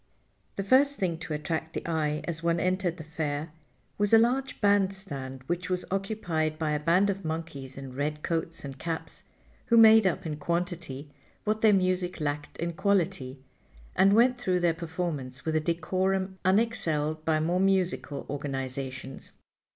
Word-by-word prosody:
The 195 - -2
first 275 +7 +4
thing 175 -7 -1
to 160 -1 -5
attract 160 +1 -3
the - - -4
eye 155 -2 0
as 165 -1 -4
one 170 0 +1
entered 185 -1 0
the 160 - -7
Fair 155 -1 -3 0.5
was 205 +2 +5
a - - +9
large 255 +4 +1
band 200 -2 +3
stand 135 -9 -7
which 175 +4 -2
was 180 -1 -1
occupied 180 -6 -1
by 155 -1 -1
a 150 - 0
band 180 +6 +3
of 195 0 -6
monkeys 160 -5 -5
in 135 -2 -7
red 150 +3 -2
coats 165 -2 -2
and 135 -1 -8
caps, 165 +1 -5 0.5
who 230 - +4
made 220 -2 +8
up 180 - -1
in 155 -2 -3
quantity 170 -3 -3 0.3
what 215 +1 0
their 220 - +6
music 185 -2 +1
lacked 145 -1 -3
in 170 +1 -2
quality, 160 -9 0 0.5
and 195 +1 +5
went 245 +3 +4
through 180 -5 +1
their 170 -1 +3
performance 160 -6 -4
with 160 -1 0
a - - +4
decorum 185 +4 -1
unexcelled 160 -7 +1
by 155 -1 +2
more 170 +4 +1
musical 185 -6 +1
organizations. 135 -1 -5
170 Hz, 165 wpm, -28 LUFS, 150-190 Hz, 0.5 s, a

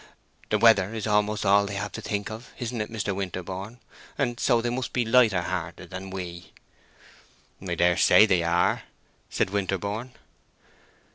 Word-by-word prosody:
The 105 - +2
weather 105 -2 +4
is 110 - -3
almost 105 0 +1
all 100 +1 +4
they 100 - -5
have 100 0 -3
to - - -7
think 105 0 -3
of, 115 +3 -9
isn't 120 -2 -3
it, 105 - -5
Mr. 105 -3 -2
Winterborne? 95 +3 -5 0.4
and 120 -4 -1
so 120 -3 +3
they 120 +1 -1
must 130 +1 -3
be 120 -2 +1
lighter 110 -6 +4
hearted 90 0 -5
than 95 +1 -7
we." 90 -2 -7 1.1
"I 90 -2 -3
dare 85 +1 +3
say 105 - +6
they 95 -5 +2
are," 85 +1 +1 0.5
said 95 - -1
Winterborne. 100 +5 -2
100 Hz, 160 wpm, -26 LUFS, 95-115 Hz, 1.1 s, say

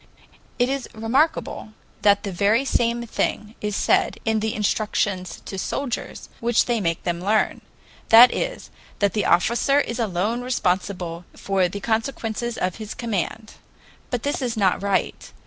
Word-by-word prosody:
It 245 - +3
is 270 -1 -3
remarkable 225 0 0 0.3
that 205 -1 +4
the 200 - -3
very 205 +8 +2
same 235 -2 0
thing 215 -1 -2
is 210 -1 -2
said - - +2
in 220 -1 +2
the 220 0 -2
instructions 200 -4 -1
to 195 - -5
soldiers 255 +4 -4
which 235 0 +2
they 235 -3 0
make 165 -3 -1
them 175 0 -2
learn 210 +3 +1 0.5
that 235 +2 +9
is, - - -4 0.3
that 200 -2 +1
the 210 - 0
officer 235 +10 +3
is 240 -4 -2
alone 215 +2 -1
responsible 180 -7 -2
for 195 -2 +1
the 200 +3 -6
consequences 225 0 -2
of 185 -1 -2
his 215 -2 -7
command. 220 -1 -3 0.6
But 245 -2 -2
this 285 0 -1
is 240 -3 -2
not 190 -3 +2
right. 200 -1 -1
220 Hz, 150 wpm, -23 LUFS, 195-235 Hz, 0.6 s, that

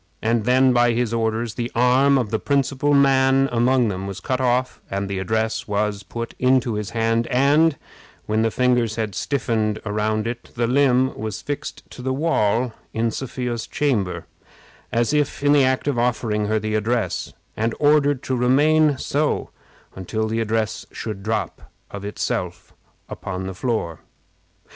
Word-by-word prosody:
And 115 -1 0
then, 130 +1 +4
by 120 -1 +3
his 115 -1 -1
orders, 115 0 -1
the 120 +1 -4
arm 130 +3 +4
of 120 -6 -1
the 110 - 0
principal 140 +1 +1
man 135 -1 +4
among 120 0 +2
them 95 0 -4
was 100 -1 -6
cut 130 +6 -2
off, 125 0 0
the 100 0 -2
address 110 +4 -1
was 105 -1 -1
put 115 +1 -6
into 125 -2 +2
his 105 -1 -3
hand, 115 0 0
and, 145 +4 +3 0.5
when 110 +1 0
the 115 - +2
fingers 125 -2 +1
had 110 -3 -2
stiffened 110 -4 -1
around 105 +1 -1
it, 120 +1 -5
the 120 0 +1
limb 130 0 +2
was 110 -1 -5
fixed 145 -1 -5
to - - -9
the 130 +1 -1
wall 125 -6 +1 0.2
in 115 0 +1
Sophia's 120 -2 -4
chamber, 110 -11 -1 0.7
as 120 +4 +1
if 150 -1 0
in 145 0 +5
the 145 -2 +5
act 130 +2 +1
of 135 -5 +1
offering 110 -3 0
her 110 +1 +1
the 110 0 -2
address, 115 +2 -1 0.2
and 115 +1 -1
ordered 145 -2 +3
to 130 - -1
remain 145 +4 +3
so 145 +3 -1 0.4
until 110 +4 -3
the 110 +1 -1
address 110 -1 -1
should 105 -4 -6
drop, 105 -4 -3 0.2
of 100 -1 -7
itself, 105 +1 -4 0.3
upon 95 -1 -5
the 95 - -4
floor. 100 -6 -2
120 Hz, 160 wpm, -22 LUFS, 110-130 Hz, 0.7 s, in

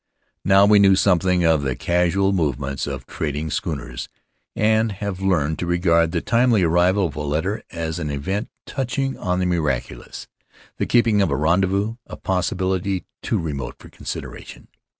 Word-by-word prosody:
Now 95 0 +6
we 105 0 +6
know 95 -1 +6
something 90 -2 +2
of 80 -3 +3
the 65 -3 -1
casual 90 +3 +1
movements 70 -5 -1
of - - -5
trading 75 0 -3
schooners - - -4 0.5
and 110 0 +2
have 100 -1 -4
learned 80 -5 +1
to 85 - -3
regard 85 -1 +3
the 85 -1 -1
timely 115 -2 +3
arrival 90 +4 +3
of 75 -5 -4
a 75 - -4
letter 80 +8 -1
as 80 -1 -4
an 75 -3 -3
event 95 +10 -3 0.2
touching 135 0 -2
on 90 0 -1
the 90 - 0
miracu 75 -8 -1
lous - - -9 0.3
— - - -27
the - - 0
keeping 115 -4 +3
of 95 - +2
a 70 - 0
rendezvous, 95 +7 +1
a - - -8
possibility 95 0 -1 0.2
too - - -1
remote 70 -6 -4
for - - -14
consideration. - - -8
90 Hz, 170 wpm, -22 LUFS, 80-100 Hz, 0.5 s, Now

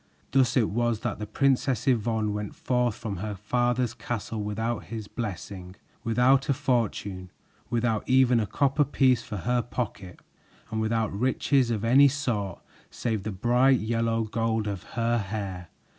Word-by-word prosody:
Thus 130 -1 +3
it 115 -5 +2
was 120 0 0
that 120 -4 -3
the 105 - -4
Princess 135 +1 +1
Yvonne 110 -3 +1
went 105 -1 -4
forth 125 -3 0
from 105 -4 -5
her 105 +3 -4
father's 120 +3 0
castle 115 -1 -4
without 110 +3 -2
his 110 -2 -6
blessing, 95 -4 -6 0.3
without 125 +5 +3
a 140 - +3
fortune, 110 -8 -1 0.4
without 115 -1 0
even 130 -2 +5
a 105 - -1
copper 140 +4 +2
piece 130 -3 +3
for 110 -3 -6
her 120 +6 +1
pocket, 105 -7 -5 0.5
and 110 0 -1
without 110 -1 0
riches 130 +3 +1
of 115 -2 -1
any 135 +5 +7
sort 115 -10 -2 0.3
save 110 -4 -2
the 110 - -4
bright 125 +6 +3
yellow 115 +1 0
gold 110 0 -1
of 100 -3 -3 0.2
her 115 0 +2
hair. 95 -4 -5
115 Hz, 155 wpm, -27 LUFS, 105-125 Hz, 0.5 s, any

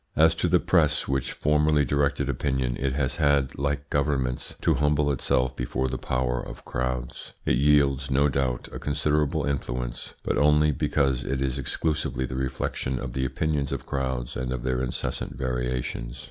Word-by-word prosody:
As 80 +1 +5
to - - 0
the - - +4
press, 75 -5 +2
which 70 -1 -1
formerly 75 0 +2
directed 70 +1 +1
opinion, 65 -2 0
it 65 -1 0
has 70 -1 -1
had, 70 -4 +2
like 70 0 -1
governments, 70 -3 0
to - - +3
humble 75 0 +2
itself 65 -1 +1
before 65 +1 -1
the 65 0 -3
power 60 0 -1
of - - -10
crowds. 65 -1 -3
It - - +2
wields, 70 -2 +3
no 70 +2 +4
doubt, 65 -2 -1
a - - -6
considerable 75 0 0
influence, 60 -3 -3
but - - 0
only 75 +1 +5
because 70 -2 +1
it 65 +1 -2
is 65 0 -1
exclusively 70 0 -1
the 65 - -6
reflection 65 0 -2
of 60 -1 -5
the 65 0 -1
opinions 70 +1 -1
of - - -4
crowds 65 -3 -2
and 65 0 -3
of 65 -1 -3
their 65 0 0
incessant 60 +2 -3
variations. 60 -1 -3
65 Hz, 170 wpm, -26 LUFS, 65-70 Hz, -, As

